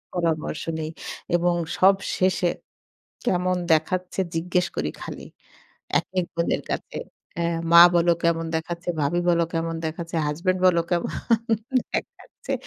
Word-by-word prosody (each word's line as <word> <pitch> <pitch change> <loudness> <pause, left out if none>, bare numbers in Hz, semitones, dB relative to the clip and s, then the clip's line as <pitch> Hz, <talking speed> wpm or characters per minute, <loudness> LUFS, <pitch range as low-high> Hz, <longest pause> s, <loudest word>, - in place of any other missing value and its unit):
পরামর্শ 165 -3 -1 0.2
নেই 155 0 -3 0.5
এবং 175 0 +2 0.2
সব 195 +1 +7 0.2
শেষে 185 -1 +2 0.8
কেমন 185 -4 +1 0.2
দেখাচ্ছে? 180 +4 0
জিজ্ঞেস 180 +2 +1
করি 75 - -1
খালি। - - -7 0.8
একেক 180 +2 -2
বোনের 170 0 0
কাছে। - - -4 0.7
মা 170 0 +10
বলো 170 0 +4
কেমন 165 0 +2
দেখাচ্ছে, 170 +2 -4
ভাবি 150 +5 +1
বললো 170 -1 +3
কেমন 165 0 -1
দেখাচ্ছে, 165 +2 -4
হাসব্যান্ড 180 +5 0
বল 180 -2 +5
কেমন 175 -1 0 0.8
দেখাচ্ছে। 485 - -5
170 Hz, 120 wpm, -24 LUFS, 165-180 Hz, 0.8 s, মা